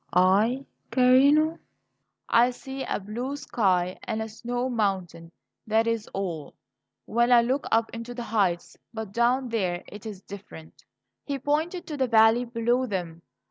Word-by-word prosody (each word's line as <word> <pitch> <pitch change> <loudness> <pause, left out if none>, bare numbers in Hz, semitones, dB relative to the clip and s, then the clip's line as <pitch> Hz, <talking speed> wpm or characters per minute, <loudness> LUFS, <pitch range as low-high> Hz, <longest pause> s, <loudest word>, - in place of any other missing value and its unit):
"I, 205 +9 +3 0.2
carino? 280 +5 +4 0.7
I 240 +2 +5
see 265 +2 -7
a - - -2
blue 235 +8 -4
sky 185 -9 0
and 220 -2 -2
a 220 - -3
snow 245 +3 -3
mountain 190 -8 -2 0.4
that 220 +1 +3
is 230 -2 -1
all 170 -7 -5 0.5
when 235 +2 +2
I 240 -1 +7
look 260 +4 -1
up 225 0 +2
into 230 +1 -7
the 240 - -4
heights. 195 -6 0 0.2
But 220 -3 -5
down 245 +3 +1
there 185 -6 -1
it 210 +2 -9
is 200 -3 -8
different." 195 -5 -12 0.4
He 280 -1 -3
pointed 315 +6 -1
to 305 -3 -6
the 260 -2 +1
valley 225 +1 +5
below 240 +2 0
them. 175 -5 -4
230 Hz, 150 wpm, -26 LUFS, 200-255 Hz, 0.7 s, I